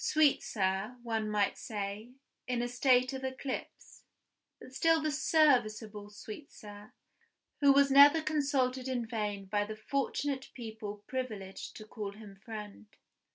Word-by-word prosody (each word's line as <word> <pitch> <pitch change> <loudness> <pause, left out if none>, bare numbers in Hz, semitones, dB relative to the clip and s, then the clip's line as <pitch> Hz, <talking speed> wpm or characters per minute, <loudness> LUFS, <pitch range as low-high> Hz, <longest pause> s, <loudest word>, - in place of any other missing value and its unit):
Sweetsir 215 -7 +1
one 225 -2 -1
might 205 -1 +1
say, 210 +2 -5 0.3
in 245 -1 0
a - - -1
state 250 +1 +3
of 265 0 -5
eclipse; 260 0 -6 0.6
but 255 - -13
still 325 +4 +3
the 310 0 -1
serviceable 230 -9 +2
Sweetsir, 210 -1 -11 0.7
who 280 -1 +6
was 280 0 +5
never 285 +3 +8
consulted 275 -4 0
in 250 -3 -1
vain 210 -3 -3
by 205 +2 0
the 215 +1 -6
fortunate 275 +3 -2
people 220 -3 -7
privileged 215 -7 -5
to 215 - -9
call 210 -2 -6
him 210 -1 -12
friend! 210 0 -9
235 Hz, 130 wpm, -32 LUFS, 210-270 Hz, 0.7 s, never